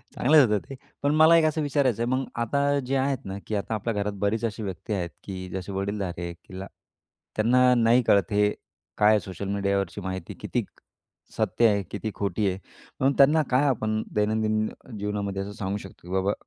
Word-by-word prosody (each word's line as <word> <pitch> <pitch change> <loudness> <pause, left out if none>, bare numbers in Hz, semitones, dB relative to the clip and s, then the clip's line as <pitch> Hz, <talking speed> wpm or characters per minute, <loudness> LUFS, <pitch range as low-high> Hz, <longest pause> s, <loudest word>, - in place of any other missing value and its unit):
चांगलंच 145 -3 +5
होतं 105 -1 +2
ते. 135 - -6 0.3
पण 145 +1 +2
मला 160 +2 +7
एक 160 - +4
असं 155 0 +1
विचारायचं 135 -5 +1
आहे. 120 - -1
मग 130 0 -1 0.2
आता 140 +4 +1
जे 135 +2 -1
आहेत 135 -1 -1
ना 95 +1 -5
की 110 - -2
आता 105 +2 -2
आपल्या 110 +2 -2
घरात 105 0 -1
बरीच 110 +3 0
अशी 110 0 -4
व्यक्ती 100 +2 -5
आहेत 90 -3 -2
की 95 -2 -6 0.2
जसे 95 +1 -5
वडीलधारे 95 -3 -3
तिला 95 +3 -10 0.7
त्यांना 125 +3 +4
नाही 120 +1 +4
कळत. 100 0 +3
हे 105 0 +3 0.5
काय 105 0 +5
आहे 110 -1 +5
सोशल 95 +1 -7
मीडियावरची 100 -2 -1
माहिती 95 -1 -5
किती - - -1 0.7
सत्य 110 +2 +3
आहे, 100 -2 +1
किती 105 +1 -4
खोटी 100 0 -1
आहे. 95 +1 -4 0.4
म्हणून 135 +2 +3
त्यांना 150 +3 +6
काय 130 +3 +4
आपण 110 -4 0
दैनंदिन 110 0 +1 0.3
जीवनामध्ये 100 -1 -2
असं 100 +1 -5
सांगू 100 0 -2
शकतो, 95 -2 -12
की 90 - -6
बाबा 95 +2 +1
105 Hz, 190 wpm, -26 LUFS, 100-125 Hz, 0.7 s, मला